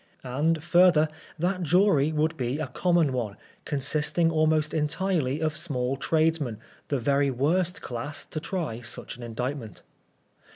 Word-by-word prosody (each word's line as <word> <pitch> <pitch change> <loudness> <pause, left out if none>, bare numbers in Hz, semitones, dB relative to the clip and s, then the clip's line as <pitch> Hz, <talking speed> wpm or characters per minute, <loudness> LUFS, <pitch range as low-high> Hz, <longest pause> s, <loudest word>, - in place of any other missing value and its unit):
And, 150 +5 0
further, 175 -3 +5 0.3
that 180 +3 0
jury 170 -3 +3
would 155 +1 0
be 130 -1 -2
a 155 - -2
common 165 +2 +1
one, 110 -5 -3 0.3
consisting 150 +4 +1
almost 155 -1 +2
entirely 155 -2 0
of 155 -1 -1
small 135 -5 -1
tradesmen, 155 -4 +1 0.3
the 140 - 0
very 140 +3 +2
worst 170 +9 0
class 125 +5 -5
to 155 - -5
try 155 - -3
such 120 +1 -4
aa - - -8
indictment. 120 -1 -5
150 Hz, 135 wpm, -27 LUFS, 130-165 Hz, 0.3 s, further